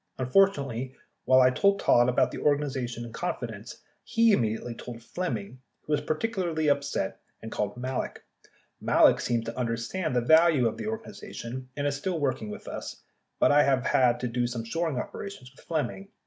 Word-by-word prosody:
Unfortunately, 135 -4 +1 0.3
while 130 +1 +6
I 130 0 +6
told 200 +8 +3
Todd 120 +1 +4
about 125 - +2
the - - -6
organization 130 -5 -1
in 115 - -10
confidence, - - -5 0.2
he 230 0 +3
immediately 115 - 0
told 115 0 -9
Flemming, 125 - -4 0.2
who 150 - -2
was 150 - +2
particularly 170 -4 -1
upset 140 -8 -1 0.2
and 110 - -7
called 105 +2 -2
Malek. 130 +1 -4 0.6
Malek - - +5
seems 115 -2 -1
to 115 - -5
understand 125 +7 -2
the - - +4
value 160 -1 +5
of 110 - -3
the - - -5
organization, 130 - -6
and 145 - -1
is 140 0 0
still 175 +3 -2
working 130 -7 -1
with - - -9
us, - - -7 0.3
but - - +4
I 145 +1 +6
have 135 -2 +2
had 125 -2 +3
to 125 - -1
do 120 0 0
some 120 -1 -4
shoring 160 +3 -2
operations 135 -1 -6
with 135 - -20
Flemming. 165 +4 -2
130 Hz, 175 wpm, -27 LUFS, 120-160 Hz, 0.6 s, while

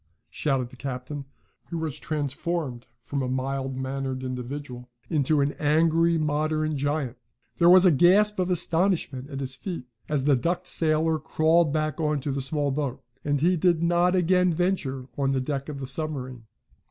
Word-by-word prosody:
shouted 135 -5 -1
the 130 - -14
captain, 135 +2 -6 0.4
who 170 - -3
was 160 -3 -3
transformed 145 -3 -3 0.2
from 140 +2 -3
a 130 - -1
mild 135 0 -2
mannered 130 0 -3
individual 125 0 -6 0.2
into 150 -1 +2
an 140 +1 +1
angry, 165 +2 +3
modern 155 0 0
giant. 145 -2 -2 0.4
There 170 0 +5
was 185 +1 +8
a 180 - +7
gasp 190 +7 +4
of 185 0 0
astonishment 165 -6 +1
at 140 -2 -5
his 130 -1 -1
feat, 170 -2 -6 0.2
as 145 -3 0
the 145 0 +4
ducked 175 +8 -1
sailor 160 -1 +1
crawled 160 +1 +2
back 155 -1 -1
into 150 -3 0
the 135 0 -2
small 145 +1 0
boat. 140 -2 -3 0.2
And 145 -1 0
he 180 +3 +3
did 170 -1 +2
not 175 +2 +3
again 180 0 +3
venture 155 -7 -1
on 135 -1 +1
the 135 - +1
deck 140 +2 -3
of 140 -2 -6
the 135 - -4
submarine. 130 -5 -4
150 Hz, 165 wpm, -26 LUFS, 135-165 Hz, 0.4 s, was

